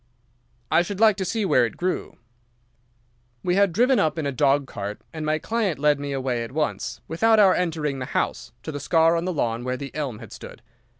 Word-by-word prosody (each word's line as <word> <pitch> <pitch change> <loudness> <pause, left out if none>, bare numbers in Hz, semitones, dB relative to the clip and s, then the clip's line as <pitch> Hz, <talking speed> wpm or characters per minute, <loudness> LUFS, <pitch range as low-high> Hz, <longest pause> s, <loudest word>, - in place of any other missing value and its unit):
"'I - - +5
should 190 +2 -4
like 220 -2 +6
to 190 - -2
see 220 +1 -1
where 130 -9 +4
it 115 - -3
grew.' 180 +1 -3 1.3
"We 180 - +1
had 200 0 +3
driven 245 +6 +3
up 155 -3 +1
in 160 - -2
a 140 - 0
dog 140 +1 +2
cart, 105 -4 -6
and 155 -1 -5
my 155 0 +1
client 210 -1 -1
led 145 0 +2
me 140 0 -4
away 130 -3 -1
at 115 - -8
once, 155 0 -2
without 220 +8 +3
our 195 -3 +6
entering 155 -6 -1
the 130 - -3
house, 125 -1 -2
to 155 - -5
the 145 - -5
scar 165 +3 +3
on 170 +1 -1
the 185 - -1
lawn 120 -5 -1
where 125 0 -2
the 140 +1 -7
elm 140 -7 -3
had - - -12
stood. - - -11
155 Hz, 220 wpm, -24 LUFS, 135-185 Hz, 1.3 s, like